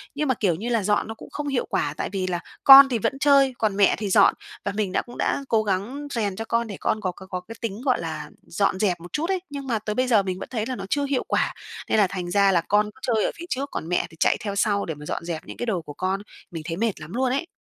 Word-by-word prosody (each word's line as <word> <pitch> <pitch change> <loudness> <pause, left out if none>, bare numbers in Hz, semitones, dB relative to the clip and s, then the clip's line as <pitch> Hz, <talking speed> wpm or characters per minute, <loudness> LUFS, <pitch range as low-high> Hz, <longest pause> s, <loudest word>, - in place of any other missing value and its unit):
nhưng 300 0 -1
mà 260 - +3
kiểu 190 -7 +1
như 220 +8 -4
là, 230 -3 +1
dọn 205 +1 +1
nó 225 - -5
cũng - - -12
không 295 -1 -4
hiệu 270 -3 0
quả, 145 0 -1
tại - - -2
vì 190 -1 -2
là 175 -1 -1 0.2
con 270 0 +11
thì 245 - +1
vẫn 270 +6 -1
chơi, 275 -2 +5
còn 215 -3 0
mẹ 200 - +5
thì 205 -2 -3
dọn. - - +6 0.3
Và 200 - 0
mình 205 -3 -1
đã - - +1
cũng 240 - -12
đã 280 - 0
cố 220 -1 +3
gắng 215 +9 -2
rèn 205 -5 -1
cho 225 - -5
con 230 +1 0
để 200 -3 -7
con 215 - 0
có 185 -3 -1
có 190 +2 -13
có 185 -1 -4
cái 225 +5 -10
tính, 225 -1 -4
gọi 255 -2 +1
là, 155 -2 -5
dọn 190 +1 0
dẹp 185 -5 +1
một 175 +1 -12
chút 325 +4 -1
ấy 380 -1 +1
nhưng 280 -1 -6
mà 230 -4 0
tới 210 0 -4
bây 255 +2 +1
giờ 220 -5 +4
mình 185 -1 -3
vẫn - - -7
thấy 225 -4 -2
là 255 - -3
nó - - -6
chưa 285 +4 +1
hiệu 275 -2 0
quả, - - +1 0.4
nên - - +3
là 205 -2 +5
thành 180 -2 -5
ra 200 0 +4
là 175 -3 +3
con 205 +5 +2
cứ 260 - -22
chơi 220 - +2
ở - - 0
phía 340 - -8
trước, 275 +2 -2
còn 160 - -4
mẹ 180 - +1
thì 160 - -17
chạy - - +3
theo 200 -2 -4
sau 200 0 +1
để 160 - -4
mà 150 0 -11
dọn 170 - -4
dẹp 170 -2 -4
những - - -9
cái 240 - -3
đồ 190 -7 -1
của 145 -2 -10
con. 190 +4 -2 0.3
Mình 165 -2 -6
thấy 165 0 -4
mệt 225 -4 -1
lắm 155 +4 -9
luôn 255 +1 +1
ấy. 280 +6 -1
210 Hz, 310 wpm, -24 LUFS, 185-250 Hz, 0.4 s, con